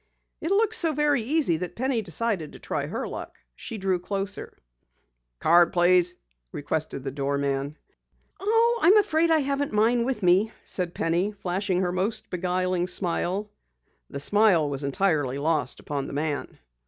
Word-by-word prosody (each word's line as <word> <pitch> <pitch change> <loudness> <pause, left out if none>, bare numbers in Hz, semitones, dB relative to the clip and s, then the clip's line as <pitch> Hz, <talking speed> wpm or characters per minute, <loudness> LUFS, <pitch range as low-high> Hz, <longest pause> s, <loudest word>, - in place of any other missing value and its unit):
It 325 - -2
looked 425 +2 +2
so 335 -8 +4
very 295 -2 +2
easy 265 - +1
that 180 +1 -6
Penny 255 -1 0
decided 190 -3 -2
to - - -12
try - - -3
her - - -4
luck. - - -8 0.2
She 225 - -7
drew 190 -2 0
closer. 195 +2 -3
"Your - - -36 0.8
card 170 +2 +4
please," 180 0 +4 0.4
requested 145 -2 -3
the 135 - -4
doorman. 140 +1 -2 0.6
"I 455 +3 +2
am 400 +4 +7
afraid 335 -5 +3
I 320 -1 +4
haven't 280 -1 -2
mine 230 +3 +3
with 240 -4 -3
me," 190 +5 +3
said 180 -2 -1
Penny, 175 +5 0
flashing 190 -1 -2
her 180 -1 0
most 215 +4 -2
beguiling 180 0 -1
smile. 185 +3 -2 0.6
The - - -6
smile 190 -1 +4
was 140 +1 -3
entirely 140 -3 0
lost 150 -3 0
upon 140 -2 -4
the - - -8
man. 145 0 -3
185 Hz, 155 wpm, -25 LUFS, 160-235 Hz, 0.8 s, am